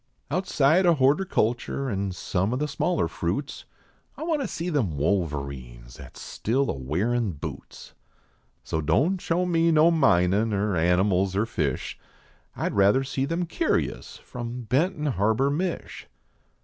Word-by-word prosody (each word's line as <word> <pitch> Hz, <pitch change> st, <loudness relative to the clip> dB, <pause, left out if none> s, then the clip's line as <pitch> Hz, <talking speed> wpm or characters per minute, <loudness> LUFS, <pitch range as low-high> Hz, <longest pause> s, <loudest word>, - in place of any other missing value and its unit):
Outside 180 Hz, -1 st, +3 dB
o 170 Hz, -, +5 dB
hortercnlture 135 Hz, -, +1 dB
an 100 Hz, 0 st, -2 dB
some 95 Hz, +4 st, -1 dB
o -, -, -1 dB
the 150 Hz, +2 st, -1 dB
smaller 170 Hz, +4 st, 0 dB
fruits -, -, -4 dB, 0.5 s
I -, -, -6 dB
want 320 Hz, -3 st, 0 dB
to 265 Hz, -, -2 dB
see 170 Hz, +2 st, -4 dB
them 110 Hz, -, 0 dB
Wolverines 70 Hz, -8 st, -3 dB
at -, -, -12 dB
s -, -, -10 dB
still 130 Hz, +5 st, -1 dB
a -, -, -3 dB
wearin 95 Hz, -, -1 dB
boots. 70 Hz, -, -9 dB, 0.7 s
So 80 Hz, -, -2 dB
don 140 Hz, -, +2 dB
show 175 Hz, +1 st, 0 dB
me 170 Hz, -1 st, +2 dB
no 160 Hz, +1 st, +5 dB
minin 105 Hz, -, +3 dB
er 100 Hz, 0 st, 0 dB
animals 90 Hz, +3 st, +2 dB
er 105 Hz, +3 st, +2 dB
fish, 75 Hz, -, -3 dB, 0.6 s
I -, -, -1 dB
d -, -, -6 dB
rather 100 Hz, +7 st, +4 dB
see 135 Hz, 0 st, -2 dB
them 165 Hz, +4 st, -1 dB
curios 315 Hz, -, -2 dB
from 120 Hz, 0 st, -7 dB
Benton 150 Hz, -, 0 dB
Harbor, 115 Hz, +1 st, +1 dB
Mich." 175 Hz, +4 st, -4 dB
120 Hz, 150 wpm, -25 LUFS, -, 0.7 s, o